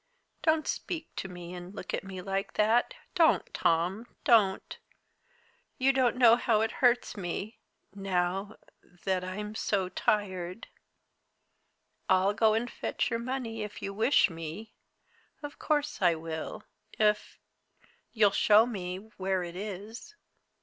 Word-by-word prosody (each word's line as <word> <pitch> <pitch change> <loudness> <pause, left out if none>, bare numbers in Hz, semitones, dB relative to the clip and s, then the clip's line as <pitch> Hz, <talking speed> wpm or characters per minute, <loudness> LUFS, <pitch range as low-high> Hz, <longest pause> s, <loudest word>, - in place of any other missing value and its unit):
Don't 315 -1 +2
speak 330 -2 -4
to - - -3
me 175 -1 -9
and 180 +2 -9
look - - -6
at - - -1
me 190 -1 -7
like 195 +1 -2
that, 230 - +2 0.2
don't, 335 -3 +3
Tom, 180 +8 +1 0.2
don't! 205 -5 +3 1.0
You 270 0 +3
don't 255 -3 +2
know 240 -2 +7
how 225 -3 +2
it 225 - 0
hurts 245 -1 +3
me, 195 +3 -5 0.3
now 195 +1 -1 0.5
that 185 -1 0
I'm 210 +3 -5
so 195 -3 0
tired. 185 0 -1 1.4
I'll 185 +2 +4
go 215 +1 +3
and 230 +2 0
fetch 250 - -2
your 230 - 0
money 235 -2 -4
if 210 -1 -7
you 195 - -3
wish 225 +7 +4
me 165 +4 -8 0.7
of 290 0 -8
course 300 -3 -1
I 175 -3 +4
will, 160 0 -6 0.3
if 210 -1 +1 0.7
you'll 210 -3 +4
show 210 +2 +5
me 185 -6 -4 0.2
where 190 -1 0
it 175 0 -7
is. 210 - -7
205 Hz, 135 wpm, -29 LUFS, 185-230 Hz, 1.4 s, know